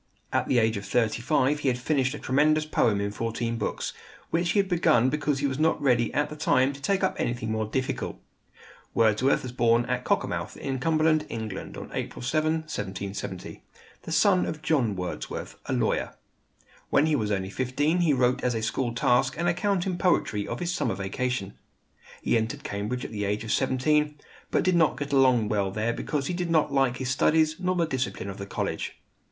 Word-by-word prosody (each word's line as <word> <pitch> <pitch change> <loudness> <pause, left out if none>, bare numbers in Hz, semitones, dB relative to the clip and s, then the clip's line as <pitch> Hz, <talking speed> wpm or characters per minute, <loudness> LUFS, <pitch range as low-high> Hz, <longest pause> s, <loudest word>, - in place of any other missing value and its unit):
At - - +1
the 130 - +2
age 110 -2 +2
of 100 - -6
thirty 115 +1 +1
five 145 +2 +2
he 145 - -2
had 125 -2 +2
finished 130 0 0
a - - -5
tremendous 150 +3 +2
poem 110 -8 +2
in 100 0 -1
fourteen 115 +2 -3
books, 105 - -3 0.4
which 170 0 +1
he - - 0
had 195 - +2
begun 130 -9 +3
because 150 -1 0
he 140 - -1
was 135 0 -1
not 160 +1 +2
ready 120 -5 +2
at 150 - +1
the 150 - -8
time 140 -2 +2
to 140 - -11
take 195 +6 0
up 190 - +1
anything 120 -2 -2
more 110 -1 -1
difficult! 130 +4 -2 0.8
Wordsworth 115 +4 +3
was 130 - -5
born 120 -1 +3
at 125 0 -2
Cockermouth, - - -1
in 135 -1 -3
Cumberland, 155 +1 +2
England, 110 -4 -5
on - - -8
April - - -4
7, 155 +4 +1
1770, 100 - -6 0.4
the - - -8
son 185 +2 +4
of 155 -1 -5
John 125 -10 +1
Wordsworth, 90 -1 -5
a - - -1
lawyer. - - 0 0.7
When 145 - +4
he 155 -1 +2
was 110 -6 -1
only 95 -2 -1
fifteen 145 - 0
he 170 -3 +3
wrote 125 -2 +2
as 125 -2 +1
a 110 - -2
school 120 +1 -1
task 125 +2 +2
an 170 - -1
account 180 +1 +1
in 180 -2 -2
poetry 105 - +1
of - - -4
his 175 0 -1
summer 95 - -1
vacation. 100 +2 -2 0.7
He - - +2
entered 110 0 -4
Cambridge 105 +5 -3
at - - -7
the 105 -2 -2
age 105 +2 -1
of 110 - -4
seventeen; 150 +3 +2 0.3
but - - +1
did 185 0 +2
not 160 -3 +3
get 145 -1 -4
along 130 -5 +4
well 100 -3 +1
there 110 +4 -1
because 145 +1 -2
he 180 - -2
did 175 -1 -2
not 155 -4 +2
like 135 -3 +2
his 130 -1 -2
studies 155 +3 +3
nor 185 0 0
the 170 -2 +2
discipline 130 -8 -3
of 95 - -10
the 100 - -6
college. - - -3
130 Hz, 205 wpm, -27 LUFS, 115-155 Hz, 0.8 s, son